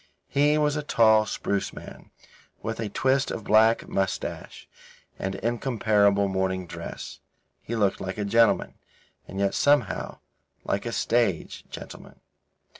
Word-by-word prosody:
He 145 +2 +3
was 150 -1 +1
a 150 - -1
tall, 110 -6 +4
spruce 100 0 -2
man, - - -12 0.5
with 110 +1 -4
a 110 -2 -2
twist 130 +5 +1
of 110 - -5
black 110 +2 +4
moustache 95 -1 -3 0.5
and 95 0 -3
incomparable 105 -3 +2
morning 95 -1 -1
dress. - - -8 0.4
He 115 - -5
looked 100 -3 +1
like 95 +1 -4
a 105 - -2
gentleman, 115 +2 +3 0.5
and 95 - -7
yet, 100 0 +1
somehow, 145 0 +1 0.5
like 100 +4 -1
a - - -2
stage 115 -7 0
gentleman. - - -10
110 Hz, 130 wpm, -26 LUFS, 100-120 Hz, 0.5 s, tall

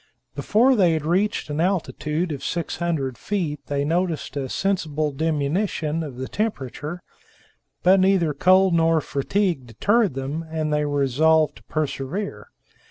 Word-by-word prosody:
Before 250 +5 +3
they 180 -7 +4
had 155 -2 -2
reached 190 +6 0
an 150 +2 -1
altitude 170 -2 -1
of 140 -3 -5
600 165 -6 -2
feet 170 -8 -2
they 140 0 -1
noticed 170 -1 -1
a 135 -2 -3
sensible 155 -6 -1
diminution 155 +2 -1
of 145 -6 -6
the 130 0 -4
temperature; 175 - -4 0.8
but 190 +2 +6
neither 185 -5 +3
cold 185 +5 +4
nor 165 -1 +3
fatigue 155 0 -1
deterred 200 - +1
them, 140 +5 -3
and 155 -1 -2
they 150 0 +1
were 145 -1 0
resolved 155 +4 +3
to - - -18
persevere. 155 +6 -3
160 Hz, 140 wpm, -23 LUFS, 145-185 Hz, 0.8 s, but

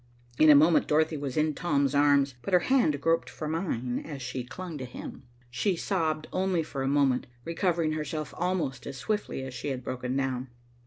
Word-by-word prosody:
In 155 - +7
a 150 - +10
moment 155 +3 +5
Dorothy 155 +1 +2
was 140 -2 -4
in 155 0 +2
Tom's 140 -4 +1
arms, 140 -1 +4
but 195 - -5
her 180 - +5
hand 235 - +2
groped 165 -3 +1
for 130 +5 -6
mine 150 -7 -2
as 145 -4 -7
she 125 +1 -4
clung 165 +4 -7
to 130 - -4
him. 125 +1 -9 0.2
She 175 - 0
sobbed 160 -4 -1
only 185 -3 +1
for 140 -3 -5
a 135 - 0
moment, 140 -2 +2 0.2
recovering 170 -1 0
herself 155 -1 -4
almost 175 -7 -2
as 140 - -6
swiftly 205 - -2
as 130 -1 -6
she 125 - -5
had 130 -2 -3
broken 125 +1 -3
down. 130 -1 -1
150 Hz, 195 wpm, -28 LUFS, 135-165 Hz, 0.2 s, a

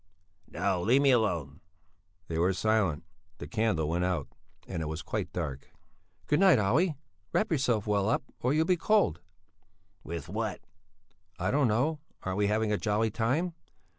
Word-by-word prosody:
"No, 95 -3 -1
leave 125 +9 +4
me 140 - +6
alone!" 85 - 0 0.7
They 80 -1 -2
were 90 +3 +3
silent. 95 -6 +1 0.3
The - - -7
candle 110 -9 0
went 85 +3 0
out 90 -5 -1 0.4
and 85 -3 -4
it 80 - -3
was 80 +1 -5
quite - - -3
dark. 70 -1 -5 0.6
"Good 150 - +2
night, 190 -6 +6
Olle; 140 - +2 0.4
wrap 215 - +1
yourself 125 -9 +1
well 105 -1 +1
up, - - +1 0.2
or 125 - +1
you'll 155 +2 +3
be 180 0 +2
cold." 200 - +2 0.8
"What 85 -3 -6
with?" - - -3 0.8
"I 90 +1 -1
don't 140 -1 +3
know. 135 +8 +1 0.2
Aren't 95 +1 -2
we 100 - +3
having 105 +1 +1
a 105 - +1
jolly 110 +1 +1
time?" 130 - 0
105 Hz, 165 wpm, -29 LUFS, 90-135 Hz, 0.8 s, me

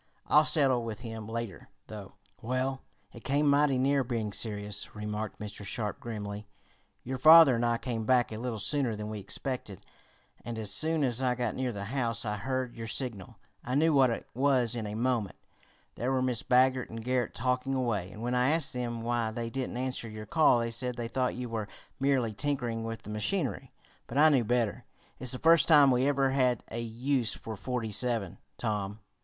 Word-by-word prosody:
I'll 150 +1 +5
settle 135 -6 +3
with 115 -1 -6
him 110 -2 -7
later, 115 -4 -5 0.2
though." 105 -3 -9 0.3
"Well, 130 +3 -2 0.3
it 120 - -12
came 145 +2 +1
mighty 140 -1 +4
near 135 +1 +2
being 115 -4 -3
serious," 105 -2 -1
remarked 105 0 -4
Mr. 105 -1 -7
Sharp 105 +1 -3
grimly. 105 -2 -6 0.6
"Your 130 +1 -4
father 160 -1 +9
and 120 0 0
I 120 0 +2
came 115 -2 -3
back 125 +1 +2
a 110 - -5
little 120 -1 -3
sooner 125 +1 0
than 105 0 -5
we 105 - -5
expected, 105 -1 -4 0.6
and 120 -1 -5
as 110 -2 -2
soon 160 +5 +1
as 125 -1 0
I 125 -1 +1
got 120 -3 -2
near 130 -1 -2
the 100 -3 -6
house 115 -1 -1
I 105 -1 -2
heard 130 +2 -3
your 115 -1 -6
signal. 115 -5 -3 0.3
I 125 - -2
knew 160 +2 +3
what 135 -3 +5
it 115 - -3
was 130 -2 +2
in 110 -3 -3
a 105 - -5
moment. 115 -4 -1 0.6
There 125 +3 -2
were 130 -1 +1
Mrs. 125 -3 -1
Baggert 130 0 +3
and 115 0 -7
Garret 125 -1 -1
talking 125 +2 -1
away, 110 -8 -1
and 105 +4 -9
when 120 +1 -1
I 125 +1 +3
asked 160 -1 +1
them 120 -2 -3
why 120 -1 0
they 115 +1 -5
didn't 130 -1 -3
answer 125 -2 -3
your 110 0 -8
call 155 -5 +4
they 115 0 -2
said 125 +1 -2
they 120 -1 -4
thought 130 0 -1
you 125 0 -4
were 110 -3 -4 0.3
merely 130 -5 +1
tinkering 120 -3 -2
with 115 0 -5
the 105 - -8
machinery. 135 - -2 0.4
But 120 - -5
I 155 +2 +7
knew 130 -6 +3
better. 120 0 0 0.3
It's 130 -3 -3
the - - -3
first 165 +3 +5
time 145 -4 +7
we 125 +2 +2
ever 135 -2 +2
had 125 -3 +1
a 115 - -3
use 120 +1 -1
for 110 - -7
'forty 120 0 -3
seven,' 115 -4 0 0.2
Tom." 105 -2 -3
120 Hz, 200 wpm, -29 LUFS, 110-130 Hz, 0.6 s, father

